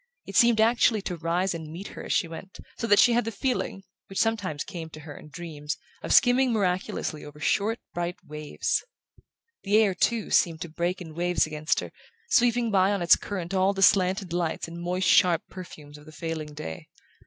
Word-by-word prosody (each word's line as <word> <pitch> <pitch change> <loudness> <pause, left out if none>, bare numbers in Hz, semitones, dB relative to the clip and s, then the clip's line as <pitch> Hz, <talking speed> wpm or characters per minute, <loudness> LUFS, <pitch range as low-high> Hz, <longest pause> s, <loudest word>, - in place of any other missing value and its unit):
It 195 - -9
seemed 235 -2 +5
actually 225 -2 +3
to 180 - -3
rise 170 +3 -1
and 160 -2 -7
meet 180 +5 -7
her - - -9
as - - -5
she 175 - +2
went, 165 +4 -10 0.2
so 230 - -2
that 205 -2 +5
she 240 - +6
had 240 +1 +2
the 225 - -4
feeling, 225 -4 -2 0.2
which 195 - -8
sometimes 200 -10 0
came 170 -5 -7
to 155 0 -11
her 145 -1 -10
in 150 - -12
dreams, 150 -1 -6 0.2
of - - -5
skimming 250 0 +5
miraculously 185 -6 -1
over 150 0 -11
short 210 +8 +1 0.2
bright 175 0 -2
waves. 150 0 -2 0.8
The 205 +1 +2
air, 215 -3 +4
too, 225 +4 0
seemed 165 -2 +2
to 170 - -5
break 175 +4 -2
in 160 -3 -9
waves 175 +2 +1
against 155 +1 -1
her, - - -8 0.4
sweeping 240 -1 +3
by 195 0 +3
on 200 -3 -1
its 170 - +7
current 185 -3 -5
all 190 +1 +3
the 195 0 0
slanted 190 -1 +3
lights 170 -2 -2
and 170 +1 -8
moist 180 +2 -1
sharp 175 -3 +4
perfumes 150 -5 -10
of 150 - -17
the - - -11
failing 155 -1 -5
day. 80 - -7
180 Hz, 200 wpm, -26 LUFS, 160-205 Hz, 0.8 s, its